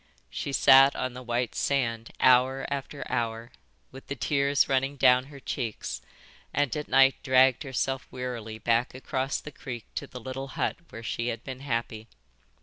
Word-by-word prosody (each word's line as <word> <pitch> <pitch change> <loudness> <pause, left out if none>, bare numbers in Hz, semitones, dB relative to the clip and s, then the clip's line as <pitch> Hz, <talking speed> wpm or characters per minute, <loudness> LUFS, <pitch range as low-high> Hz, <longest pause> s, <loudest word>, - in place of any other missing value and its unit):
She 140 - -4
sat 135 0 +7
on 130 - -2
the 125 - -8
white 120 -1 -2
sand, 115 -5 -1
hour 130 +1 +4
after 140 +1 -4
hour, 115 +1 -2 0.4
with 135 +1 -12
the 140 - -4
tears 140 +1 +2
running 135 +1 0
down 125 -1 +5
her 140 0 -12
cheeks, 120 -5 -4 0.5
and 145 -2 0
at 150 0 -4
night 135 0 +5
dragged 130 -1 +4
herself 135 -2 -2
wearily 120 -4 -5
back 115 +2 0
across 130 +1 -2
the 150 - -9
creek 125 -5 -7
to - - -4
the 125 - -9
little 130 +3 -6
hut - - 0
where 115 - -9
she 115 +2 -3
had 115 -1 -3
been 130 -1 -7
happy. 115 -4 -3
130 Hz, 165 wpm, -27 LUFS, 120-135 Hz, 0.5 s, sat